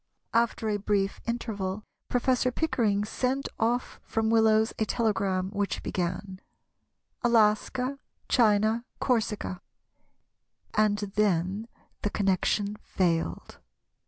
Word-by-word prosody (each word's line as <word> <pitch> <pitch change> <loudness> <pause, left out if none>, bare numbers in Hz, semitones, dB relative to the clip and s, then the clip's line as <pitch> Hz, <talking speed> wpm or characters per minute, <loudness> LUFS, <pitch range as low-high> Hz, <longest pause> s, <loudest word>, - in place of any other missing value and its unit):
After 230 -1 +1
a 210 -1 +1
brief 200 -1 0
interval 210 -4 -3 0.3
Professor 255 0 +2
Pickering 220 -9 +1
sent 260 +5 -1
off 240 +2 0
from 225 0 0
Willows 220 -1 +4
a 220 - +2
telegram 195 -5 0
which 200 -1 -2
began—"Alaska, 215 +7 -1 0.3
China, 220 0 +3 0.2
Corsica," 220 -7 -1 1.1
and 215 -1 +3 0.2
then 200 +1 +1 0.3
the 205 - 0
connection 200 +1 0
failed. 170 -5 -1
215 Hz, 90 wpm, -28 LUFS, 200-235 Hz, 1.1 s, Willows